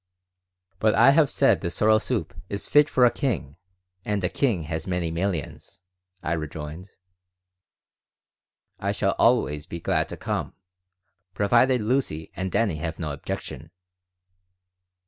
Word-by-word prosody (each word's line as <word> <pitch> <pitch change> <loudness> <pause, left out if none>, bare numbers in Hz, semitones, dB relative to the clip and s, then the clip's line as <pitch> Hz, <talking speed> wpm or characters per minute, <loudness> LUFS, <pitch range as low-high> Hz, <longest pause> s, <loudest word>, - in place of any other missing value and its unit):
"But 110 -1 +3
I 120 +5 +7
have 150 -1 +4
said 115 - +3
the 85 - -2
sorrel 110 +4 +3
soup - - -3 0.2
is 100 0 -4
fit 150 0 +4
for 125 - +4
a 120 - +5
king, 95 - -3 0.5
and 105 -2 -2
a 90 - +1
king 110 - 0
has 80 +1 -4
many 90 -3 -1
millions," 85 -1 -4 0.4
I 80 - -1
rejoined. 80 +3 -6 1.9
"I - - -1
shall - - 0
always 75 0 +2
be 85 - -6
glad - - 0
to - - -7
come, - - -3 0.8
provided 120 +4 +3
Lucy 105 - -1
and 95 0 -3
Dannie 100 -9 +1
have 80 +1 -4
no 75 -4 -4
objection." 80 +2 -6
95 Hz, 135 wpm, -25 LUFS, 80-115 Hz, 1.9 s, I